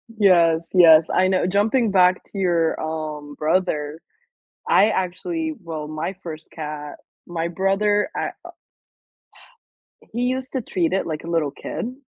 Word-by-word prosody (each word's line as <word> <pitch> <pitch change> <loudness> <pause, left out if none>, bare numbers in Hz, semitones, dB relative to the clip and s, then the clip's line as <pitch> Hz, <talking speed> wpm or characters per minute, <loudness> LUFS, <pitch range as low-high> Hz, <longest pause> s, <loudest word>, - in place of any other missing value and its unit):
Yes, 170 -7 +3
yes, 165 -3 +7
I 185 - +3
know 185 -1 +1
jumping 210 +4 +2
back 185 -1 +4
to - - -11
your, 170 -4 +1
um, 155 -2 -5
brother. 155 -2 -1 0.7
I, 210 - +5
actually 315 - -2
well, 160 -3 -6
my 155 +4 -4
first 160 -2 -8
cat 150 -2 -6 0.3
my 170 -1 -2
brother 195 - +1
I - - -1 0.2
u - - -9 1.6
He 240 +2 -1
used 255 +1 -2
to 260 - -1
treat 180 -6 -1
it 190 - 0
like 155 -2 -4
a 170 - -7
little 165 -4 0
kid. 230 - -5
175 Hz, 145 wpm, -22 LUFS, 160-200 Hz, 1.6 s, yes